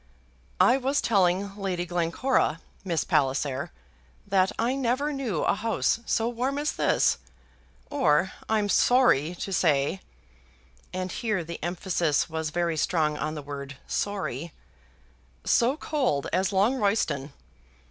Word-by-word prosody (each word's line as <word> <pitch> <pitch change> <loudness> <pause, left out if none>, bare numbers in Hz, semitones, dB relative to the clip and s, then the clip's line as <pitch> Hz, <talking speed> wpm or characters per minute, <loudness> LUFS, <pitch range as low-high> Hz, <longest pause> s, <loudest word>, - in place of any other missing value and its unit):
"I 250 - +6
was 275 +2 0
telling 195 -1 +1
Lady 190 -3 -2
Glencora, 175 - 0 0.2
Miss 170 -5 0
Palliser, 140 -4 0 0.5
that 190 -1 +2
I 235 +3 +1
never 270 +3 0
knew 245 - -2
a - - +3
house 225 +2 0
so 225 0 +1
warm 250 +4 -2
as 295 +1 0
this, - - +2 0.7
or, 190 - +2 0.2
I'm 215 -2 +2
sorry 195 - +3
to 195 +2 -5
say," 155 0 +2 0.9
and 185 0 -3
here 215 -5 -1
the 170 0 -8
emphasis 175 -3 0
was 160 -1 -3
very 170 0 -1
strong 155 -1 +1
on 155 +1 -3
the 150 - -6
word 140 -1 -7
sorry, 195 -5 -3 0.9
"so 250 +5 +3
cold 260 - 0
as 190 +3 +1
Longroyston." 200 - +1
190 Hz, 125 wpm, -27 LUFS, 160-230 Hz, 0.9 s, I